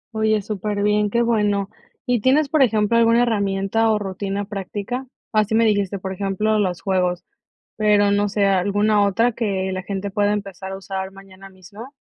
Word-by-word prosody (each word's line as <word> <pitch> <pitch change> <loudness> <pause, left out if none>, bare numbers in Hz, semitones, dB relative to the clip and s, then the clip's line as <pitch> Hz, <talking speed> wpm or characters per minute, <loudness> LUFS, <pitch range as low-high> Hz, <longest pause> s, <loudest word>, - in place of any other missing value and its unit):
Oye, 220 -1 +1
superbién, 210 0 0
qué 235 +3 +1
bueno, 205 -4 0 0.3
¿y 245 -4 +1
tienes, 280 +5 +3
por 300 +1 +1
ejemplo, 220 -3 +2
alguna 230 +1 +4
herramienta, 200 0 0
o 215 - +3
rutina 200 0 -4
práctica? 205 +6 -5 0.2
Ah, 215 -1 +3
sí 215 +1 -2
me 230 +1 +4
dijiste, 205 -2 +1
por 190 0 -5
ejemplo, 200 +3 0
los 180 -4 -1
juegos, 180 -2 -1 0.5
pero, 210 -1 +3
no 205 0 +1
sé, 205 0 +1
¿alguna 205 +2 +2
otra, 230 +5 +2
que 195 -5 -2
la 185 - -3
gente 200 +1 -5
pueda 205 +1 +1
empezar 195 -2 -6
a 190 - -5
usar 190 0 -5
mañana 195 0 -14
mismo? 195 +5 -12
205 Hz, 175 wpm, -21 LUFS, 195-220 Hz, 0.5 s, alguna